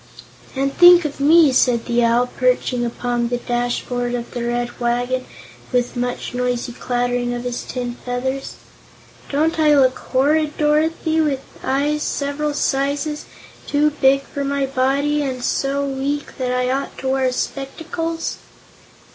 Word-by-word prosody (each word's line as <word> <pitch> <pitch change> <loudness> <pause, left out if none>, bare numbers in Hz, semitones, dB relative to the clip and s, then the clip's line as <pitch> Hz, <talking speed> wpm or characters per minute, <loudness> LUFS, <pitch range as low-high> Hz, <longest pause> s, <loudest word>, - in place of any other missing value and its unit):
"And 275 +1 0
think 350 -1 +8
of 290 -2 -4
me," 305 +1 +6
said 245 -2 +2
the 240 0 +1
Owl, 235 +1 +3
perching 250 -1 +1
upon 240 0 -1
the 245 +1 -1
dashboard 245 0 -2
of 240 -1 -5
the 240 - -4
Red 240 0 -2
Wagon 245 +2 -1 0.4
with 245 -1 0
much 245 0 -3
noisy 245 0 -1
clattering 245 0 -1
of 240 - -5
his 245 -1 -3
tin 245 -1 -4
feathers. 260 +2 -3 0.7
"Don't 315 +3 +1
I 300 -1 +5
look 260 -2 +3
horrid, 295 +3 +1
Dorothy, 315 +1 +1
with 285 -4 0 0.2
eyes 290 +3 0
several 290 +1 -2
sizes 285 +2 -1 0.4
too 295 +1 +2
big 275 -1 +3
for 280 +1 -5
my 280 0 0
body, 275 +3 +1
and 260 -3 -3
so 275 +2 0
weak 280 +1 -3
that 250 -1 -1
I 250 0 0
ought 275 +1 -3
to 265 - -3
wear 265 -1 +1
spectacles?" 325 +6 -4
265 Hz, 145 wpm, -20 LUFS, 245-290 Hz, 0.7 s, think